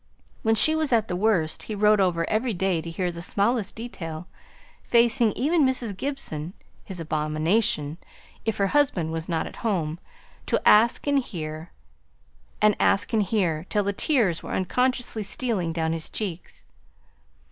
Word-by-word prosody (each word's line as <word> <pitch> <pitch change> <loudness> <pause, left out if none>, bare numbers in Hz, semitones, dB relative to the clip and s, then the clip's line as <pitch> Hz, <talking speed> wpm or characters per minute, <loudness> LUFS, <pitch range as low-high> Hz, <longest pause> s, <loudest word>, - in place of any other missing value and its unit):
When 225 0 +2
she 310 +8 +4
was 315 -3 0
at 225 -2 +2
the 180 - -1
worst, 180 -6 +1
he 215 - -6
rode 210 0 +4
over 170 -3 +1
every 225 0 0
day 180 -2 0
to 165 - -7
hear 180 +1 -2
the 170 0 -8
smallest 205 +3 0
detail, 175 -8 -7 0.6
facing 235 -1 +3
even 310 +4 +2
Mrs. 255 -6 -1
Gibson 185 - -4 0.3
(his 190 -3 -8
abomination) 155 +1 0 0.4
if 225 - -1
her 200 - +2
husband 195 - +1
was 165 +1 -4
not 165 -2 0
at - - -9
home, 175 -8 -1 0.5
to - - +2
ask 225 +3 +5
and 285 -1 +3
hear, 160 -8 -6 0.9
and 215 -1 +5
ask 200 +2 +2
and 220 - +3
hear, 180 -5 0
till 210 -1 +1
the 200 +1 -1
tears 210 - +1
were - - -6
unconsciously 245 +3 0
stealing 205 -4 -2
down 160 0 -1
his 165 -1 -4
cheeks. 185 -5 -5
200 Hz, 160 wpm, -25 LUFS, 165-230 Hz, 0.9 s, ask